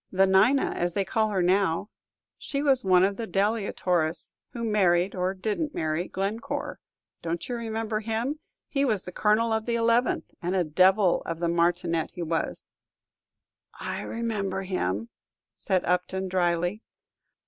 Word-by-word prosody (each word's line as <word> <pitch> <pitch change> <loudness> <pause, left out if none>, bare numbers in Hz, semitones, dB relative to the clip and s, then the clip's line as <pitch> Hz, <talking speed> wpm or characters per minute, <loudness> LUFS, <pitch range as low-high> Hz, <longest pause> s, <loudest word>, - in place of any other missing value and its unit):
"The 190 0 +4
Nina, 205 +9 +4
as 175 -1 -2
they 195 - +1
call 220 +1 +1
her 190 -3 0
now. 185 +1 +1 0.5
She 280 -1 -3
was 270 -3 +3
one 185 -1 +5
of 195 +1 +1
the 230 - -4
Delia 205 +1 0
Torres, 170 -2 -1 0.2
who 235 - -6
married, 190 -4 +2
or 185 +1 -1
didn't 220 +10 -2
marry, 160 +2 -1
Glencore. 225 +9 -3 0.4
Don't 170 0 -3
you 245 - -3
remember 225 -2 -2
him? 230 +7 -2 0.3
He 275 -1 0
was 215 -9 0
Colonel 220 +3 +2
of 220 +1 -1
the 235 - +1
Eleventh, 235 +1 +1
and 175 +2 -1
a 185 - +3
devil 185 +4 +4
of 165 -1 -3
a - - +3
martinet 170 -1 +1
he 175 - -3
was." 165 0 -3 1.1
"I - - -4
remember 205 -5 -3
him," 115 - -2 0.4
said 185 -1 -1
Upton, 185 +2 0
dryly. 175 +2 0
195 Hz, 150 wpm, -27 LUFS, 175-225 Hz, 1.1 s, one